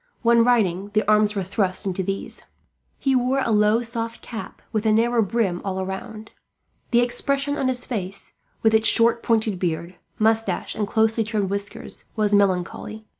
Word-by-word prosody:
When 235 0 +5
riding, 205 -6 +1
the 215 -2 +2
arms 210 0 +3
were 195 - -1
thrust 190 +1 -1
into 190 -1 -2
these. 195 +1 -5 0.5
He 270 -1 +1
wore 255 +2 +1
a - - 0
low 210 +2 +3
soft 230 0 -5
cap 225 -2 -8
with 220 0 -1
a - - +4
narrow 230 +2 +3
brim 200 -4 0
all 190 -1 -3
round. 215 +3 -7 0.6
The 240 0 +4
expression 275 +3 0
of 270 -3 -1
his 250 -1 -1
face, 195 -5 -5 0.3
with 220 0 +4
its 220 0 +4
short 230 0 +5
pointed 220 -4 0
beard, 170 0 -3 0.2
moustache, 225 +1 0
and 210 -1 -2
closely 225 +1 +2
trimmed 210 -3 -2
whiskers, 200 0 -5
was 210 -1 +1
melancholy. 200 +2 0
220 Hz, 170 wpm, -23 LUFS, 195-230 Hz, 0.6 s, When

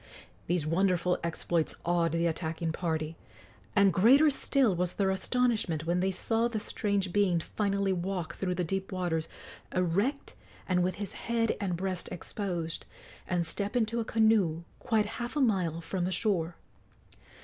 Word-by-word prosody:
These 175 -3 0
wonderful 180 +1 +2
exploits 170 -1 -1
awed 170 -1 +2
the 165 0 +1
attacking 165 0 -1
party, 160 -1 -2 0.6
and 200 -2 +5
greater 270 +10 +6
still 270 -5 +3
was 180 0 -1
their 195 -1 +2
astonishment 190 -6 0
when 175 +2 +1
they 190 +1 +2
saw 225 +5 +1
the 230 -2 -3
strange 200 -3 -1
being 195 -4 +3
finally 200 +2 0
walk 180 -2 -3
through 180 -2 -2
the 180 - 0
deep 195 +3 -3
waters, 175 -4 -1 0.5
erect 195 - 0 0.3
and 180 -1 +2
with 180 0 0
his 200 -1 -4
head 230 -1 0
and 180 -4 -1
breast 185 0 -3
exposed, 175 -3 -4 0.4
and 175 -2 0
step 200 +7 -3
into 230 -1 +1
a - - 0
canoe 215 -8 +2 0.2
quite 220 -4 +1 0.2
half 240 +3 -4
a - - +1
mile 185 - +1
from 175 +1 -2
the 185 - -1
shore. 180 -5 0
185 Hz, 155 wpm, -30 LUFS, 170-210 Hz, 0.6 s, greater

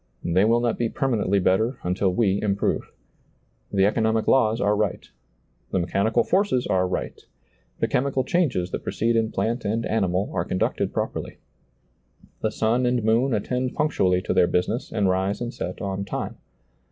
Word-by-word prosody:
They 90 +4 +3
will 115 +2 +3
not 120 -1 0
be 120 -1 +1
per 135 - -1
manently 100 -6 +1
better 110 +8 +2
until 90 +2 +1
we 100 -1 +1
improve. 100 -1 -1 0.8
The 95 -1 +3
economic 110 +1 +1
laws 115 -3 +3
are 105 -3 +2
right. 105 -2 -2 0.6
The - - -1
mechanical 100 +6 +1
forces 185 -10 +1
are 95 -1 +1
right. 90 - -4 0.6
The - - +2
chemical 135 0 0
changes 125 - 0
that - - -3
proceed 115 +1 0
in 110 -1 +1
plant 120 +2 -1
and 115 +3 -1
animal 95 -3 0
are 85 - 0
conducted 95 - -1
properly. - - -4 1.0
The 110 - +1
sun 115 +3 +1
and 125 -2 +1
moon 115 +5 +2
attend 125 +4 -2
punctually 95 -12 +1
to - - -1
their 90 - +4
business 90 +8 -1
and 105 -3 +1
rise 95 +2 0
and 120 0 -4
set 90 - -5
on 100 0 -2
time. 100 - -5
110 Hz, 165 wpm, -24 LUFS, 95-120 Hz, 1.0 s, their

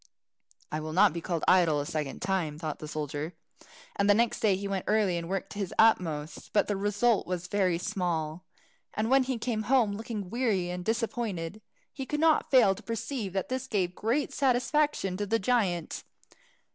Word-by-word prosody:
"I 155 - -2
will 155 0 -5
not 190 0 +5
be 170 - -4
called 170 -2 -2
idle 170 -5 +4
a 145 - -2
second 150 -3 -4
time," 185 -6 -1
thought 155 -2 -4
the 155 - -7
soldier, 150 +2 -4 0.6
and 200 - +1
next 225 +3 +3
day 205 -3 +3
he 200 +1 -4
went 195 -2 -2
early 210 -4 +2
and 170 0 -4
worked 195 0 -3
his 200 -4 -4
utmost. 165 -9 +2
But 210 - +3
the 205 - 0
result 205 +3 +1
was 180 -1 -3
very 185 -2 +1
small. 175 -4 -2 0.5
And 220 +3 -1
when 270 -1 +5
he 260 -1 -1
came 225 -1 -2
home, 250 -6 +4
looking 210 -3 -5
weary 215 -8 0
and 180 0 -5
disappointed, 220 -5 -2 0.3
he 270 -2 -6
could 295 - -2
not 320 0 +3
fail 250 -8 +6
to 195 - -11
perceive 230 -2 -4
that 190 -1 -2
this 260 0 -3
gave 185 -7 0
great 235 +10 -1
satisfaction 265 -6 +1
to 205 +1 -2
the 225 +3 +2
giant. 195 -7 0
200 Hz, 185 wpm, -29 LUFS, 175-230 Hz, 0.6 s, fail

